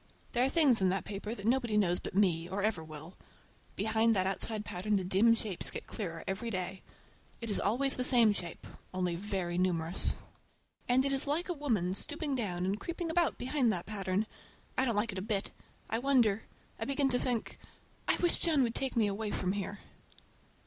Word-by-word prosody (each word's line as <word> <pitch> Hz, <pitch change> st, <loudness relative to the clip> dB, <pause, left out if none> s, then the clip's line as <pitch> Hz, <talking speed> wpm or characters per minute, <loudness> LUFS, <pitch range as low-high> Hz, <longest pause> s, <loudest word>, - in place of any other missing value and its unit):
There 245 Hz, -, +2 dB
are 265 Hz, -, +3 dB
things 275 Hz, -9 st, +4 dB
in 190 Hz, -, +4 dB
that 195 Hz, +1 st, -1 dB
paper 210 Hz, +2 st, -4 dB
that 200 Hz, -, -8 dB
nobody 240 Hz, -2 st, +2 dB
knows 180 Hz, -4 st, +3 dB
but -, -, -7 dB
me, 175 Hz, -4 st, +2 dB
or 195 Hz, +2 st, -2 dB
ever 205 Hz, -7 st, 0 dB
will. 155 Hz, +2 st, -9 dB, 0.6 s
Behind 220 Hz, +2 st, +2 dB
that 185 Hz, -1 st, +3 dB
outside 210 Hz, +3 st, 0 dB
pattern 205 Hz, +4 st, -1 dB
the 190 Hz, -, +1 dB
dim 195 Hz, +6 st, +4 dB
shapes 210 Hz, -5 st, -2 dB
get -, -, -6 dB
clearer 165 Hz, -7 st, -5 dB
every 200 Hz, +5 st, -2 dB
day. 185 Hz, -2 st, -3 dB, 0.6 s
It 230 Hz, -2 st, -4 dB
is -, -, +1 dB
always 265 Hz, +7 st, +2 dB
the 250 Hz, -, -1 dB
same 240 Hz, -4 st, +5 dB
shape, 175 Hz, -4 st, -5 dB, 0.3 s
only 180 Hz, -2 st, +1 dB
very 180 Hz, -2 st, -2 dB
numerous. 170 Hz, -2 st, +1 dB, 0.7 s
And 260 Hz, +2 st, +4 dB
it 275 Hz, -, +2 dB
is 270 Hz, +1 st, 0 dB
like 320 Hz, +6 st, 0 dB
a -, -, +1 dB
woman 225 Hz, -, 0 dB
stooping 295 Hz, -, -2 dB
down 185 Hz, -8 st, -1 dB
and 195 Hz, +3 st, -1 dB
creeping 340 Hz, -1 st, -3 dB
about 340 Hz, 0 st, +2 dB
behind 255 Hz, -1 st, +1 dB
that 175 Hz, -2 st, -3 dB
pattern. 200 Hz, -1 st, -1 dB, 0.5 s
I 260 Hz, -, +2 dB
don't 235 Hz, -4 st, 0 dB
like 220 Hz, +2 st, +1 dB
it 190 Hz, -, -4 dB
a -, -, -4 dB
bit. 205 Hz, -1 st, -1 dB, 0.4 s
I 225 Hz, -, -1 dB
wonder—I 240 Hz, -6 st, 0 dB
begin 275 Hz, 0 st, +1 dB
to 250 Hz, -1 st, +1 dB
think—I 240 Hz, -3 st, -3 dB
wish 350 Hz, -1 st, +2 dB
John 310 Hz, -6 st, +3 dB
would 230 Hz, -2 st, 0 dB
take 265 Hz, 0 st, -1 dB
me 225 Hz, -2 st, +4 dB
away 205 Hz, +1 st, -2 dB
from 185 Hz, -2 st, -1 dB
here! 200 Hz, 0 st, -4 dB
215 Hz, 195 wpm, -32 LUFS, 190-250 Hz, 0.7 s, same